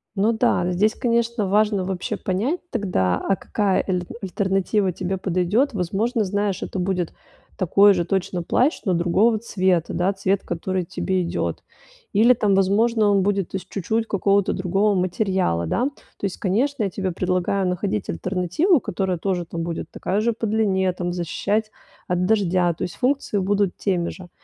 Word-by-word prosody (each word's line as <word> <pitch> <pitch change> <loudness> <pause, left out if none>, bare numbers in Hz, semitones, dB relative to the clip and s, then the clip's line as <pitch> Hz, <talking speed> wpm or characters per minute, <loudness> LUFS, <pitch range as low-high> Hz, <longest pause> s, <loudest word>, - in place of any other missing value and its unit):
Ну 210 +3 +2
да, 220 -6 +1
здесь, 210 +5 +2
конечно, 235 -3 0
важно 205 0 +2
вообще 190 +3 -3
понять 215 - -1
тогда, 135 - 0
а 195 - 0
какая 200 -1 0
эль 180 -2 0 0.2
альтернатива 195 +1 0
тебе 185 +2 -3
подойдет. 190 +9 +1
Возможно, 210 +5 0
знаешь, 200 -1 -1
это 190 - -4
будет 180 -2 -1 0.4
такой 200 +3 +5
же 175 -2 -1
точно 180 -1 -1
плащ, 255 - +1
но 190 - +2
другого 190 +7 +2
цвета, 185 -6 0
да, 185 +3 +1
цвет, 195 0 0
который 180 +2 -2
тебе 185 +2 -1
идет. 170 - -3 0.5
Или 225 +5 +6
там, 210 -4 +1
возможно, 210 +3 +3
он 200 -1 +3
будет 200 -2 -1
из 190 - -2
чуть-чуть 220 +4 -2
какого-то 200 -1 +2
другого 195 +3 +1
материала, 185 - 0
да. 245 - 0 0.3
То - - -25
есть, 195 - -3
конечно, 235 +7 0
я 200 - 0
тебе 190 -1 -2
предлагаю 185 +2 0
находить 170 - -2
альтернативу, 180 - +1
которая 185 -4 -2
тоже, 180 0 -2
там 165 0 -5
будет 170 0 -4
такая 200 +3 -1
же 235 +1 +1
по 225 - -4
длине, 195 -3 +1
там 175 0 -3
защищать 200 +5 -1 0.4
от 180 0 0
дождя. 185 -4 +2
То - - -6
есть, - - -4
функции 260 -4 0
будут 200 0 +1
теми 180 -4 0
же. 180 -2 -10
195 Hz, 165 wpm, -22 LUFS, 180-210 Hz, 0.5 s, Или